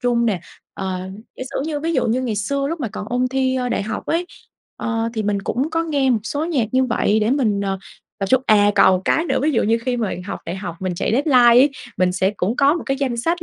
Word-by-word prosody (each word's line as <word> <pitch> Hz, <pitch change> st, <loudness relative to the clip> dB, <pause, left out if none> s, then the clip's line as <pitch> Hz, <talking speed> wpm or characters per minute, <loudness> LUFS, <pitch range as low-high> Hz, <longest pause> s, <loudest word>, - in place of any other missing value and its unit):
trung 240 Hz, -1 st, +1 dB
nè. 200 Hz, -6 st, 0 dB, 0.3 s
Ờ, 190 Hz, -1 st, -3 dB, 0.4 s
giả -, -, -5 dB
sử -, -, -2 dB
như 295 Hz, -2 st, -3 dB
ví 330 Hz, +2 st, -1 dB
dụ -, -, +1 dB
như 245 Hz, +3 st, 0 dB
ngày 225 Hz, -4 st, -2 dB
xưa 275 Hz, +7 st, -1 dB
lúc 330 Hz, -1 st, -4 dB
mà 240 Hz, -, -2 dB
còn 205 Hz, 0 st, -7 dB
ôn 250 Hz, +1 st, 0 dB
thi, 260 Hz, 0 st, 0 dB
ơ, 250 Hz, -1 st, -1 dB
đại 235 Hz, -, -1 dB
học 220 Hz, +2 st, -5 dB
ấy, 340 Hz, +2 st, 0 dB, 0.5 s
ờ, 225 Hz, 0 st, -2 dB
thì 220 Hz, -, -1 dB
mình 200 Hz, -1 st, -1 dB
cũng 265 Hz, +10 st, -1 dB
có 330 Hz, +1 st, 0 dB
nghe 285 Hz, -5 st, +1 dB
một 230 Hz, -, +2 dB
số 290 Hz, +6 st, -2 dB
nhạc 285 Hz, -10 st, 0 dB
như 260 Hz, 0 st, +3 dB
vậy 220 Hz, -3 st, +1 dB
để 215 Hz, +3 st, +1 dB
mình, 225 Hz, -8 st, +1 dB
ờ, 195 Hz, -1 st, -2 dB, 0.4 s
tập 195 Hz, -, -1 dB
trung 260 Hz, +3 st, +3 dB
à, 205 Hz, -1 st, +5 dB
còn 190 Hz, -1 st, +6 dB
một 185 Hz, -, -6 dB
cái 325 Hz, -, +2 dB
nữa, -, -, 0 dB
ví 310 Hz, -, +2 dB
dụ 235 Hz, -, +2 dB
như 225 Hz, +2 st, +2 dB
khi 250 Hz, -, +1 dB
mà 225 Hz, -4 st, -1 dB
học -, -, -5 dB
đại 175 Hz, +3 st, -4 dB
học, 180 Hz, -4 st, -6 dB
mình 185 Hz, -1 st, -2 dB
chạy 170 Hz, -, -1 dB
deadline 250 Hz, -3 st, +5 dB
ấy, 290 Hz, -, +3 dB, 0.3 s
mình 180 Hz, 0 st, +2 dB
sẽ 190 Hz, +1 st, +1 dB
cũng 210 Hz, +7 st, -1 dB
có 285 Hz, +2 st, +4 dB
một 345 Hz, -, -4 dB
cái 270 Hz, -, 0 dB
danh 265 Hz, -4 st, -1 dB
sách 335 Hz, +8 st, -1 dB
240 Hz, 275 wpm, -20 LUFS, 205-275 Hz, 0.5 s, còn